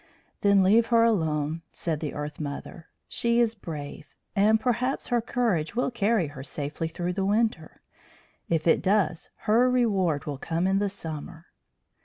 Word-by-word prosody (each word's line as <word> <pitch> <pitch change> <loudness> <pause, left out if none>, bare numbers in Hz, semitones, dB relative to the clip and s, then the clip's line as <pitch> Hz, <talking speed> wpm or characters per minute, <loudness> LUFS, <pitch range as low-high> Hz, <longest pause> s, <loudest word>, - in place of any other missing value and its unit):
"Then 200 -1 +5
leave 220 +5 +4
her 230 -1 +4
alone," 160 -7 +1
said 160 -3 -3
the 150 -2 -4
Earth 150 0 -5
mother. 150 +3 -6 0.2
"She 235 0 +1
is 230 -2 +3
brave, 150 -6 -8 0.3
and 215 +2 +4
perhaps 250 +2 -1
her 240 -2 +2
courage 225 -9 -1
will 250 +1 0
carry 220 -4 +1
her 145 -2 -9
safely 145 +3 -4
through 175 +2 -3
the 195 +1 -1
winter. 205 -5 0 0.7
If 165 -2 0
it 165 - +4
does 190 -4 +1 0.2
her 235 +4 +4
reward 195 - +1
will 145 -3 -4
come 165 +4 -1
in 195 +1 +2
the 205 0 0
summer." 165 -2 -7
190 Hz, 160 wpm, -26 LUFS, 160-225 Hz, 0.7 s, Then